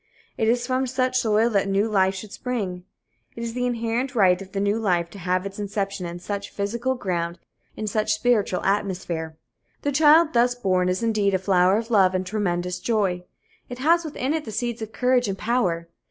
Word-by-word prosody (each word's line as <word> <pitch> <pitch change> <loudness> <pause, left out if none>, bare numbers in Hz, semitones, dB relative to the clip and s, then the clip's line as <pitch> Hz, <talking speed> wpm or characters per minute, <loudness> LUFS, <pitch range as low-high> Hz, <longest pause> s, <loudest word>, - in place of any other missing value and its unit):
It 220 - 0
is 240 +1 +2
from 260 +1 0
such 255 0 +1
soil 225 0 +2
that 200 -2 +2
the - - -3
new 200 +3 +2
life 190 -3 +2
should 200 +1 -8
spring. 200 -9 -4 0.5
It 230 - -6
is 230 -1 -4
the 250 0 -1
inherent 240 +3 -2
right 185 -4 +4
of 195 0 -10
the 195 - -3
new 205 +2 +1
life 175 -5 0
to 200 - -10
have 180 +1 -1
its 200 +1 -7
inception 200 -2 -3
in 170 0 -6
such 200 +3 -5
physical 235 +6 -2
ground, 175 -6 -2 0.4
in 215 - -3
such 215 +1 0
spiritual 215 -5 +1
atmosphere. 180 -5 -2 0.5
The 285 - 0
child 310 +3 +5
thus 245 +1 +3
born 185 -6 +1
is 185 +5 -1
indeed 210 -4 +2
a - - +4
flower 185 0 +3
of 230 +1 -4
love 190 -4 +4
and 185 0 -1
tremendous 180 -3 -2
joy. 195 -6 0 0.4
It 245 - -6
has 335 +6 +3
within 295 -3 -2
it 320 -1 -1
the 220 - -7
seeds 235 +2 -3
of 220 0 -5
courage 250 0 +2
and 195 -1 -3
of - - -12
power. 185 -8 0
210 Hz, 210 wpm, -24 LUFS, 185-245 Hz, 0.5 s, child